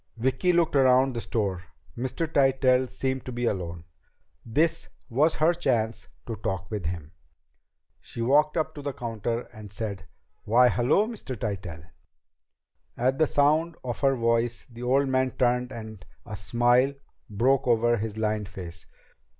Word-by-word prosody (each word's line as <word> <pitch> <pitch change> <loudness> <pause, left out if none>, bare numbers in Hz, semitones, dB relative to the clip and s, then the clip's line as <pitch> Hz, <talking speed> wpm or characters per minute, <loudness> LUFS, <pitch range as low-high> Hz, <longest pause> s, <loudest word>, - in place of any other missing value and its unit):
Vicki 130 +9 +1
looked 170 -3 +2
around 130 0 +4
the 115 - -2
store. 100 -7 -2 0.3
Mr. 130 +7 -2
Tytell 135 -3 +3
seemed 130 0 -2
to 130 - -5
be 120 0 -2
alone. 85 -6 -3 0.6
This 155 +8 0 0.2
was 145 +7 +2
her 160 +3 +3
chance 120 -9 -1 0.2
to 115 - -4
talk 95 -1 -4
with 100 -7 -3
him. 80 -3 -5 0.9
She - - -10
walked 150 +6 +3
up 155 0 -1
to 145 - -8
the 140 -1 -4
counter 115 -1 -3
and 105 -3 -10
said, 100 -3 -5 0.4
"Why, 125 +3 +5
hello, 125 - +2
Mr. 210 - -6
Tytell." 95 -7 -4 1.1
At 130 +3 +1
the 155 - +4
sound 155 +4 +2
of 120 -2 -4
her 135 -1 +3
voice 115 0 0
the 120 +1 -10
old 135 +3 +2
man 130 0 +1
turned 125 0 0
and 110 -5 -8 0.2
a 105 - -6
smile 120 +7 +2 0.3
broke 130 +6 +2
over 120 0 +3
his 110 0 -4
lined 105 -2 -1
face. 90 -3 -9
120 Hz, 150 wpm, -26 LUFS, 110-135 Hz, 1.1 s, Why